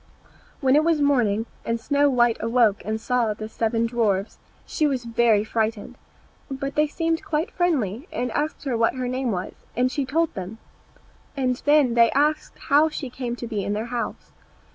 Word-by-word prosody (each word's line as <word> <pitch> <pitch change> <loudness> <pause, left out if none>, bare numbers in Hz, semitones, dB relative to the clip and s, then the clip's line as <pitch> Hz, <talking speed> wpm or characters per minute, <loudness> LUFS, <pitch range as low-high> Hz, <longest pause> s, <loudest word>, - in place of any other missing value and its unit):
When 265 -1 +4
it 305 - +5
was 330 -1 +2
morning, 235 -7 +2 0.2
and 230 0 -2
Snow 285 +4 +2
white 240 -3 +3
awoke 230 -2 +2
and 220 +1 -2
saw 230 -2 0
the 215 +1 -6
seven 225 +1 0
dwarfs, 220 -4 -1 0.3
she 305 - 0
was 260 -4 -2
very 230 -2 +3
frightened; 225 +2 -2 0.5
but 275 0 -4
they 300 0 +2
seemed 330 +2 -1
quite 320 +7 -2
friendly, 290 - -1
and 250 -1 -2
asked 300 +5 -2
her 265 -4 -1
what 230 +2 +2
her 255 -1 -3
name 255 0 -2
was, 185 -4 -3 0.2
and 250 +1 +2
she 285 - -1
told 320 +5 0
them; 190 +3 -6 0.8
and 255 -2 0
then 290 -4 +4
they 235 -1 +5
asked 300 +2 0
how 295 +3 +3
she 280 -4 -6
came 245 -2 -4
to 245 - -7
be 215 -4 -3
in 205 - -2
their 215 +2 -2
house. 240 - -4
245 Hz, 185 wpm, -24 LUFS, 225-285 Hz, 0.8 s, it